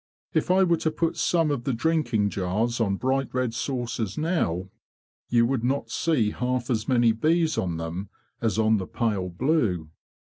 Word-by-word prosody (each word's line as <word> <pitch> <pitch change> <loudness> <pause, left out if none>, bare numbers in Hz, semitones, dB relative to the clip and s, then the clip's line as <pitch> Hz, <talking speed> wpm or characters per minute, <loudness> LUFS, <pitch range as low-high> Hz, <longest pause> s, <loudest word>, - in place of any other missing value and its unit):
If - - 0
I 190 +1 +5
were 170 -2 +3
to 160 - 0
put 165 +1 -1
some 165 -3 +2
of 135 -4 -2
the 135 - -1
drinking 115 -6 +1
jars 110 +6 -1
on 100 -3 +1
bright 130 +4 -1
red 130 -2 0
saucers 120 -4 -3
now, 95 - -1 0.6
you 120 -1 +4
would 125 -1 -1
not 135 +3 -1
see 130 -11 +1
half 125 +1 -2
as 110 -2 -1
many 120 -3 +4
bees 160 +7 +1
on 85 -3 -1
them 85 +4 -5 0.3
as 110 -2 0
on 110 0 +3
the 95 -2 -4
pale 105 -6 -1
blue." 90 - 0
120 Hz, 175 wpm, -26 LUFS, 105-145 Hz, 0.6 s, I